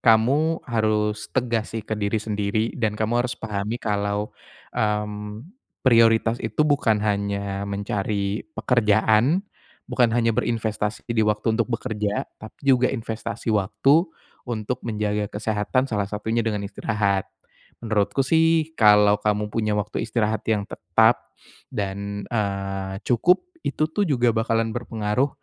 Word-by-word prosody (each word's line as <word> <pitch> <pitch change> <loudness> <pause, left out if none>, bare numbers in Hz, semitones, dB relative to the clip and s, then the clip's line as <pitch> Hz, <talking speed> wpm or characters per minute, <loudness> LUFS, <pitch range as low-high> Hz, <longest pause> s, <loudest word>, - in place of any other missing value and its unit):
kamu 135 +9 +3
harus 110 -2 0
tegas 115 -3 -1
sih 110 - -4
ke 110 - -5
diri 100 +2 0
sendiri 105 +1 -1
dan 105 -2 0
kamu 110 +3 +1
harus 125 - -2
pahami 105 0 -3
kalau, 105 0 -1 0.4
mmm, 105 +1 -2 0.4
prioritas 115 -1 +5
itu - - -2
bukan 140 -8 +2
hanya 100 -1 -1
mencari 100 0 -2 0.2
pekerjaan, 115 - +3 0.4
bukan 120 -2 +3
hanya 115 -1 +2
berinvestasi 110 -2 -1
di 115 -1 +1
waktu 105 +2 +1
untuk 115 +1 0
bekerja, 105 -3 -2 0.2
tapi 110 - -12
juga 130 -2 +4
investasi 115 -1 -5
waktu 115 - +3 0.4
untuk 115 +1 -3
menjaga 105 -2 -1
kesehatan, 110 +4 0
salah 105 -4 -1
satunya 110 +3 -1
dengan 105 -3 -1
istirahat. 100 -1 -1 0.6
Menurutku 105 +2 +1
sih 160 +1 +3
kalau 105 -1 +6
kamu 105 0 0
punya 110 -2 0
waktu 105 +1 -2
istirahat 110 -2 0
yang 105 -2 +1
tetap - - +1 0.4
dan, 100 -1 -4
eee, 100 -3 -2
cukup, 175 - +3 0.2
itu 155 - 0
tuh 205 +4 +1
juga 120 -5 +3
bakalan 115 0 0
berpengaruh 115 +2 -1
110 Hz, 125 wpm, -24 LUFS, 105-115 Hz, 0.6 s, kalau